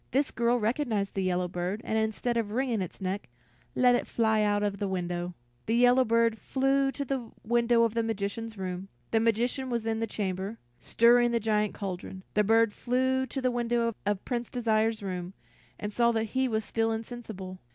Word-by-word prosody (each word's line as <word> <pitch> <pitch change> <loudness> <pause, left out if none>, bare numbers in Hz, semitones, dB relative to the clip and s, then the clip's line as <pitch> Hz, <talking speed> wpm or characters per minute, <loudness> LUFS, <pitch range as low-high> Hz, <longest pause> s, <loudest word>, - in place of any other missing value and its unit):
This 275 +2 +1
girl 240 +1 +2
recognized 220 -3 0
the 195 - -1
yellow 180 -1 0
bird, 180 +3 -3
and 220 - -2
instead 220 +2 0
of 230 -3 0
wringing 240 -1 0
its 185 +2 -6
neck, 190 -4 -3 0.5
let 250 -1 +5
it 245 - 0
fly 220 -2 +2
out 205 0 +2
of 200 -1 -1
the 205 - -1
window. 175 -1 -3 0.3
The 225 - +2
yellow 245 +2 +5
bird 230 -1 +2
flew 270 0 +1
to 280 +2 -3
the 255 -3 -3
window 235 +1 +3
of 230 -2 +1
the 230 - +1
magician's 225 0 -3
room. 185 0 -4 0.2
The 225 - +3
magician 235 +4 +1
was 235 -2 -2
in 225 0 0
the 225 - -1
chamber, 195 +1 -3 0.2
stirring 240 +1 +4
the 235 0 +1
giant 210 -1 0
cauldron. 190 -1 -6
The 210 - +3
bird 225 0 +4
flew 260 +2 0
to 270 - -4
the 255 - +2
window 235 -1 0
of 205 -1 -1
Prince 240 -2 -2
Desire's 225 -3 +1
room, 185 -1 -4 0.4
and 210 0 -4
saw 235 +1 +3
that 225 -1 +1
he 260 0 +2
was 220 -3 -1
still 225 0 0
insensible. 220 -5 -6
225 Hz, 195 wpm, -29 LUFS, 205-240 Hz, 0.5 s, let